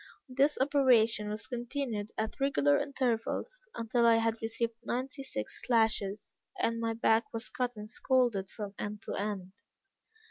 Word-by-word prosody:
This 275 +3 +2
operation 250 -6 +4
was 210 0 -4
continued 240 -4 -3
at 220 +4 -3
regular 145 - +3
intervals, 280 - -2
until 235 +1 +2
I 230 - +7
had 225 0 +1
received 230 +1 -1
ninety 260 +2 -3
six 110 - -5
lashes, 220 -4 +1 0.3
and 230 -8 +1
my 230 0 0
back 225 0 +2
was 225 0 -4
cut 250 -1 -2
and 210 0 -7
scalded 230 -4 +1
from 205 -2 -6
end 210 0 -5
to - - -5
end. 195 -2 -3
230 Hz, 145 wpm, -31 LUFS, 210-255 Hz, 0.3 s, I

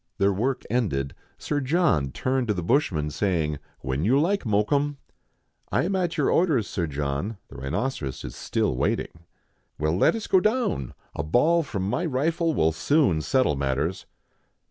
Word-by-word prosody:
Their 100 0 +3
work 125 +6 -1
ended, 85 - -1 0.2
Sir 145 - -2
John 140 - +2
turned 130 - -1
to 105 - +1
the 90 - -3
bushman, 85 - +1
saying, 80 -6 0
" - - -36
When 65 +3 -2
you 125 +8 +4
like, 190 +2 +1
Mokoum." 140 +8 +1 0.4
" - - -46 0.3
I - - +2
am 190 +3 0
at 175 -3 -1
your 145 - +2
orders. 155 - +3
Sir 85 -3 -2
John: 75 +8 -3
the - - -11
rhinoceros 70 - -3
is - - -7
still - - -1
waiting." 85 +6 -2 0.2
" - - -45
Well, 75 +2 +1
let 95 - +4
us 225 - -4
go 190 - +4
down, 215 - 0 0.2
a - - -2
ball 135 - +3
from 100 - -3
my 140 - -1
rifle 160 +2 0
will 80 +1 +3
soon 90 - +2
settle 130 - +2
matters." 70 +6 -1
105 Hz, 175 wpm, -25 LUFS, -, 0.4 s, you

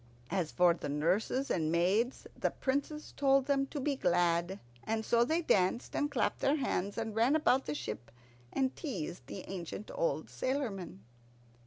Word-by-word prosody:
As 180 -5 0
for 175 -1 +5
the 165 - -5
nurses 180 - +1
and 160 -3 +1
maids, 195 +9 +1
the - - 0
Princess 285 +3 -2
told 275 -1 +4
them 275 -1 +1
to 290 - -5
be 280 +1 0
glad; 175 -2 +1 0.2
and 220 0 -1
so 235 0 +4
they 320 +7 +1
danced 190 -1 +1
and 290 - +1
clapped 275 -4 0
their 275 - +3
hands, 205 -9 -1
and 225 -2 -3
ran 235 +6 +4
about 270 -4 +3
the 150 - -2
ship, 115 -3 -5 0.4
and 265 -1 0
teased 210 - -5
the 190 - -7
ancient 190 +2 -6
old - - 0
sailormen. 210 - -3
225 Hz, 165 wpm, -33 LUFS, 175-275 Hz, 0.4 s, for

